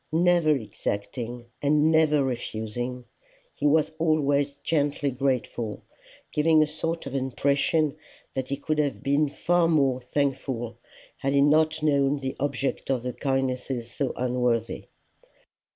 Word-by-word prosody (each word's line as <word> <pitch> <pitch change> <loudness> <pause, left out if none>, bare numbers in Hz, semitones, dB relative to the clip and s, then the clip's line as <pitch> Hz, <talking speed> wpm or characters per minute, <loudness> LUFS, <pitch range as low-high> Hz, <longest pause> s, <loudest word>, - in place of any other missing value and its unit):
Never 170 0 +3
exacting 120 +1 -4 0.2
and 150 +2 +3
never 155 -2 +4
refusing, 120 0 -4 0.5
he 145 - 0
was 155 +1 +3
always 145 -3 +2
gently 145 -2 0
grateful, 125 -4 -2 0.5
giving 155 +1 +4
a - - -1
sort 165 +2 -3
of 135 - -6
impression 140 +3 +1 0.4
that 130 -1 -3
he 140 - -1
could 150 +2 -1
have 145 -3 -1
been 140 +2 +2
far 175 +3 +2
more 135 -6 +2
thankful 130 -3 -2 0.4
had 135 +1 -1
he 140 - +4
not 155 +2 +3
known 140 -1 +3
the 135 -1 -4
object 140 0 -2
of 130 -3 0
the 125 0 -3
kindnesses 130 -2 -2
so 135 +2 -1
unworthy. 125 -2 -1
140 Hz, 130 wpm, -26 LUFS, 125-150 Hz, 0.5 s, never